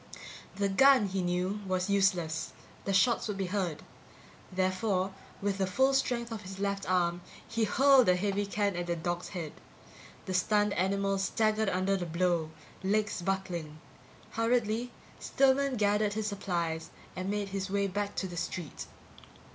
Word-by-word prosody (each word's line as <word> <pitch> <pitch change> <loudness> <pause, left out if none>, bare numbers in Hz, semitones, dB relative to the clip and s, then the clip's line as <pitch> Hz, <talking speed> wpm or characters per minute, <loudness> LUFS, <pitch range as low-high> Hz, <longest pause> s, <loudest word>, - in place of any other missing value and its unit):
The 200 0 +1
gun, 260 +4 +6
he 190 0 -1
knew, 180 +3 -1
was 185 -1 0
useless; 180 -5 +1 0.3
the 200 - 0
shots 230 +6 +3
would 205 -2 -3
be 195 - -1
heard. 180 -7 -1 0.7
Therefore, 185 +1 0 0.3
with 200 -1 0
the 190 - +1
full 265 +9 +3
strength 235 -3 0
of 225 -2 -5
his 190 -1 -8
left 200 -1 -2
arm, 175 -1 +1 0.3
he 230 -1 0
hurled 265 0 +5
a 180 - +5
heavy 200 +2 -1
can 200 -1 0
at 175 0 -3
the 170 - 0
dog's 175 +1 -3
head. 165 -6 -5 0.7
The 190 - -3
stunned 205 +2 +2
animal 195 +2 0
staggered 215 +1 +1
under 185 +1 +1
the 175 -2 -4
blow, 170 -1 0 0.3
legs 210 0 0
buckling. 175 -5 -3 0.5
Hurriedly, 230 +1 0 0.3
Stillman 275 0 +2
gathered 210 -1 +2
his 215 0 -2
supplies 170 -5 -2 0.3
and 185 +1 -3
made 205 -1 -2
his 195 0 -3
way 200 0 +1
back 200 +1 -2
to 190 - -2
the 175 -1 -8
street. 170 -2 -5
195 Hz, 155 wpm, -30 LUFS, 180-210 Hz, 0.7 s, gun